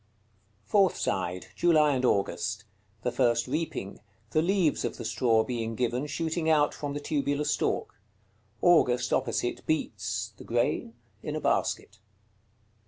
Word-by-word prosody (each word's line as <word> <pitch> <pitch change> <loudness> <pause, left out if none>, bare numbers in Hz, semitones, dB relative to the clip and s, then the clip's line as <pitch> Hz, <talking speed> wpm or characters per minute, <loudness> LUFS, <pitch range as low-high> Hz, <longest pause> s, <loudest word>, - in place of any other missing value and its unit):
Fourth 195 -4 +3
side. 90 -1 -2
July 155 -4 +4
and 130 -1 -1
August. 105 -2 0 0.4
The 125 - 0
first 120 -2 +2
reaping; 135 -8 -3 0.3
the 155 - +3
leaves 175 -3 +2
of - - -3
the 115 - -6
straw 115 -1 +2
being 115 -2 -3
given, 125 +4 -1
shooting 160 +2 -1
out 150 -2 +4
from 145 -1 -5
the - - -2
tubular 145 0 -1
stalk. 145 - -1 0.6
August, 125 -8 +4
opposite, 120 -1 -1
beats 100 - -2
(the - - -11
grain?) 115 -1 -1 0.3
in 150 - -4
a - - -1
basket. 105 -8 -1
125 Hz, 135 wpm, -28 LUFS, 115-155 Hz, 0.6 s, July